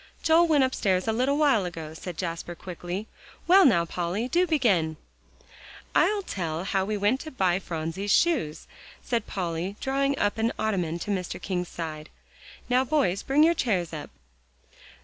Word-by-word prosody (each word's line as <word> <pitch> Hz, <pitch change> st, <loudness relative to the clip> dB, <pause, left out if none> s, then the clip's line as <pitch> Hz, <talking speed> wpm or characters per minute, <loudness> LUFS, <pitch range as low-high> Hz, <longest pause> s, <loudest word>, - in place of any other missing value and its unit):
"Joel 330 Hz, +1 st, +5 dB
went 300 Hz, -4 st, +4 dB
upstairs 195 Hz, -7 st, 0 dB
a 220 Hz, -, +2 dB
little 260 Hz, +5 st, +1 dB
while 280 Hz, -9 st, +3 dB
ago," 165 Hz, -3 st, -6 dB
said 170 Hz, +1 st, -7 dB
Jasper 170 Hz, -1 st, -4 dB
quickly. 180 Hz, +4 st, -6 dB, 0.4 s
"Well, 380 Hz, +3 st, +7 dB
now, 170 Hz, -10 st, +4 dB
Polly, 180 Hz, +7 st, -2 dB
do 355 Hz, +6 st, +2 dB
begin." 195 Hz, -, +2 dB, 1.0 s
"I'll 415 Hz, -1 st, +3 dB
tell 165 Hz, -, -3 dB
how 190 Hz, 0 st, 0 dB
we 210 Hz, +1 st, -2 dB
went 205 Hz, +6 st, +2 dB
to 315 Hz, -, -7 dB
buy 190 Hz, -, +1 dB
Phronsie's 170 Hz, +3 st, -3 dB
shoes," 265 Hz, -, +2 dB, 0.4 s
said 235 Hz, -3 st, -1 dB
Polly, 180 Hz, 0 st, -3 dB
drawing 275 Hz, +1 st, 0 dB
up 205 Hz, -1 st, 0 dB
an 225 Hz, +1 st, +1 dB
ottoman 180 Hz, -6 st, -1 dB
to 205 Hz, +5 st, -4 dB
Mr. 185 Hz, -3 st, -3 dB
King's 180 Hz, -2 st, -3 dB
side. 155 Hz, -2 st, -6 dB, 0.6 s
"Now, 250 Hz, +1 st, +3 dB
boys, 260 Hz, -9 st, +1 dB
bring 285 Hz, +3 st, +3 dB
your 335 Hz, +2 st, +5 dB
chairs 190 Hz, -, -1 dB
up." 150 Hz, -2 st, -6 dB
200 Hz, 160 wpm, -26 LUFS, 175-265 Hz, 1.0 s, Well